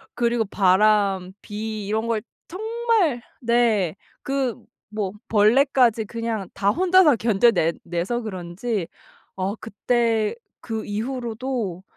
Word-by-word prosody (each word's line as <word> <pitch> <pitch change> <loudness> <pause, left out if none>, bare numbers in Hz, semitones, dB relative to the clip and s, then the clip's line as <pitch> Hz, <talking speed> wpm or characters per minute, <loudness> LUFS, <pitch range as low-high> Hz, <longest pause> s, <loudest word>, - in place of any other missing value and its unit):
그리고 235 -1 +1
바람, 195 -1 +3
비 215 0 -5
이런 220 +2 -1
걸 225 -2 0 0.3
정말 435 - 0 0.2
네. 230 -7 +2 0.3
그 270 -4 -2 0.3
뭐 210 -3 -2 0.2
벌레까지 230 +1 +4
그냥 230 -3 -4
다 200 0 +1
혼자서 355 - +5
견뎌내 210 -6 +3
내서 175 +8 -2
그런지 190 0 -4 0.5
어 190 +2 -2
그때 225 0 0 0.3
그 225 -2 -4
이후로도 230 -3 -3
220 Hz, 200 characters per minute, -23 LUFS, 200-245 Hz, 0.5 s, 혼자서